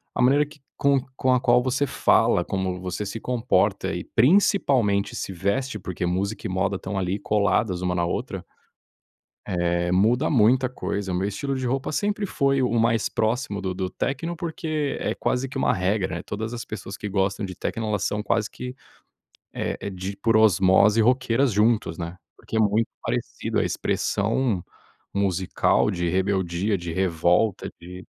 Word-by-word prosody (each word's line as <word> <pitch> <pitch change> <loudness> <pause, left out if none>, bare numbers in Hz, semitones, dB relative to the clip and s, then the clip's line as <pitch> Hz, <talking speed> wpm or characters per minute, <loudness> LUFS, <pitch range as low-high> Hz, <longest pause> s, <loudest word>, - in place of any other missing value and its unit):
a - - 0
maneira 140 +4 +4
que 150 0 -17 0.2
com 140 -1 +3 0.2
com 130 0 +2
a 125 - +2
qual 125 0 +4
você 130 +3 0
fala, - - +3
como 95 -1 -2
você 95 +3 -4
se 100 +3 -5
comporta 125 0 0
e - - -3
principalmente 125 - +3
se 95 - -4
veste, 105 +7 -1
porque 90 -2 -4
música 100 +5 -2
e - - -6
moda 95 +1 0
estão 95 +1 -5
ali 95 +2 -1
coladas 100 -2 +1
uma 90 0 0
na 85 -1 0
outra - - -3 1.0
Eh 85 -1 0
muda 115 +10 +3
muita 125 0 +4
coisa 100 -6 -3
o - - -1
meu 95 +3 0
estilo 135 +7 -3
de 130 -1 -2
roupa 135 +3 -1
sempre 205 +3 -1
foi 140 -5 +1
o 120 -2 +1
mais 115 -1 +2
próximo 110 -1 -1
do 95 -1 -2
do 95 0 -2
techno, 165 - -3
porque 155 -4 -2
é - - -1
quase 130 +1 -1
que 135 - -11
uma - - +2
regra, 95 -2 0
eh, - - -7
todas 110 +3 -5
as 120 - -5
pessoas 100 -1 -7
que 105 - -5
gostam 95 +1 0
de 95 - -7
techno 110 +5 -3
elas 105 -3 -1
são 105 0 -1
quase 110 0 0
que, 125 0 -7 0.8
eh - - -3
eh, 100 - -4
de 95 +1 -5
por 115 -1 +2
osmose 100 +1 +5
roqueiras 130 +1 +2
juntos, 105 -4 +2
né, 85 +1 -6 0.2
porque 110 - -5
é - - +3
muito 110 +2 +2
parecido - - -2
a - - +2
expressão 105 -2 0 0.5
musical 95 -2 +1
de 85 -1 -1
rebeldia, 95 +1 0
de 85 -1 -5
revolta 90 +3 +1
de 90 +2 -10
105 Hz, 175 wpm, -24 LUFS, 95-125 Hz, 1.0 s, osmose